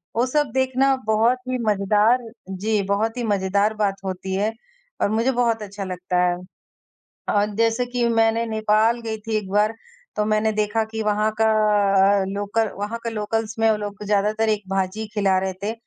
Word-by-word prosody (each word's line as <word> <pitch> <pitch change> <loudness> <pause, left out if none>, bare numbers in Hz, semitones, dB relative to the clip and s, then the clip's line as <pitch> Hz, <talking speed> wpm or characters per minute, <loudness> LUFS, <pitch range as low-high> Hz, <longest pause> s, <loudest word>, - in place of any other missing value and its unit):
वो 235 +2 +2
सब 295 +2 0
देखना 265 +1 +2
बहुत 220 +3 +3
ही 255 - 0
मजेदार 210 +4 +3 0.3
जी, 205 +3 -1
बहुत 210 +4 -1
ही 245 - -2
मजेदार 200 0 +1
बात 205 -2 0
होती 190 0 -4
है 210 +3 0 0.5
और - - +2
मुझे 225 +5 +1
बहुत 235 -3 +1
अच्छा 200 0 -7
लगता 185 -1 -3
है। 175 0 +2 0.9
अ, 205 0 +3
जैसे 230 +2 +2
कि 245 -1 -1
मैंने 225 0 +2
नेपाल 220 +1 +2
गई 225 -1 -4
थी 220 -1 0
एक 210 -3 -3
बार 210 +2 +2 0.4
तो 210 - +1
मैंने 215 +1 +1
देखा 215 +1 0
कि 220 0 -5
वहाँ 210 0 +1
का 220 - +4 0.8
लोकल 205 +3 -1
वहाँ 210 +3 -3
का 230 - -2
लोकल्स 220 0 -2
में 225 0 +4
वो 215 - +2
लोग 205 0 -6
ज्यादातर 210 +2 +1
एक 210 -1 0
भाजी 195 +3 -1
खिला 195 -3 +2
रहे 190 0 -2
थे 210 +2 -1
215 Hz, 180 wpm, -22 LUFS, 205-225 Hz, 0.9 s, का